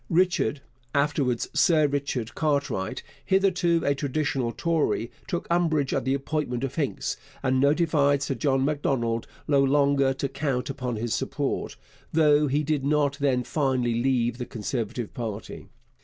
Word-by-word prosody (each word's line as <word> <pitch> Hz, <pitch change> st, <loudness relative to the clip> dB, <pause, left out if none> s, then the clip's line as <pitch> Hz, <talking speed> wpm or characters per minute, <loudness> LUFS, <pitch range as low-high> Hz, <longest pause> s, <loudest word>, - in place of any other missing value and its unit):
Richard 170 Hz, -4 st, +2 dB, 0.3 s
(afterwards 140 Hz, -4 st, +1 dB
Sir 155 Hz, -3 st, +4 dB
Richard) 140 Hz, -5 st, -2 dB
Cartwright, 140 Hz, -11 st, -1 dB, 0.2 s
hitherto 180 Hz, -3 st, +2 dB
a 140 Hz, -, +3 dB
traditional 140 Hz, -3 st, -1 dB
Tory, 155 Hz, -6 st, 0 dB, 0.2 s
took 175 Hz, -, -2 dB
umbrage 160 Hz, -5 st, +2 dB
at -, -, -1 dB
the 135 Hz, +1 st, +2 dB
appointment 140 Hz, -3 st, -2 dB
of 135 Hz, -1 st, -2 dB
Hincks, 145 Hz, -4 st, -2 dB, 0.3 s
and 130 Hz, 0 st, +2 dB
notified 145 Hz, -1 st, +3 dB
Sir 140 Hz, -, -1 dB
John 135 Hz, +2 st, +1 dB
Macdonald 130 Hz, -6 st, -1 dB, 0.2 s
no 140 Hz, -2 st, +4 dB
longer 140 Hz, -1 st, +3 dB
to 140 Hz, -, -2 dB
count 135 Hz, -2 st, -2 dB
upon 125 Hz, -3 st, -3 dB
his 110 Hz, +1 st, -2 dB
support, -, -, -2 dB, 0.4 s
though 150 Hz, -2 st, +4 dB
he 145 Hz, +3 st, +1 dB
did 150 Hz, -2 st, 0 dB
not 145 Hz, 0 st, +1 dB
then 130 Hz, -3 st, +1 dB
finally 130 Hz, -4 st, 0 dB
leave 120 Hz, -2 st, +1 dB
the 125 Hz, -, -3 dB
Conservative 115 Hz, +1 st, -4 dB
party. 110 Hz, -3 st, -6 dB
140 Hz, 140 wpm, -26 LUFS, 125-150 Hz, 0.4 s, Sir